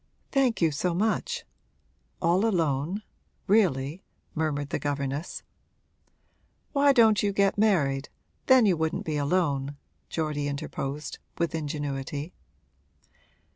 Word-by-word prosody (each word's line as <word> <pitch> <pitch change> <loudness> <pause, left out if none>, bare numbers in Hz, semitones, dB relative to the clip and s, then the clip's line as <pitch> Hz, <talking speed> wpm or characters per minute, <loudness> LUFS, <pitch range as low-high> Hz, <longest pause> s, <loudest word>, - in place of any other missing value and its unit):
'Thank 260 - +2
you 160 - +4
so 170 +4 -1
much. 225 - 0 0.8
All 175 +4 +3
alone, 170 -2 0 0.4
really?' 175 -6 +2 0.3
murmured 145 -3 -1
the - - -1
governess. 140 +2 -3 1.3
'Why 280 0 +5
don't 225 -5 +5
you 205 - +1
get 200 0 +2
married? 150 -10 +2 0.4
then 260 -3 +7
you 190 -4 +4
wouldn't 160 +1 -1
be 155 -2 -1
alone,' 145 -3 0 0.3
Geordie 150 -3 -1
interposed, 140 0 -4 0.2
with 170 -1 0
ingenuity. 145 0 -4
160 Hz, 105 wpm, -27 LUFS, 145-200 Hz, 1.3 s, then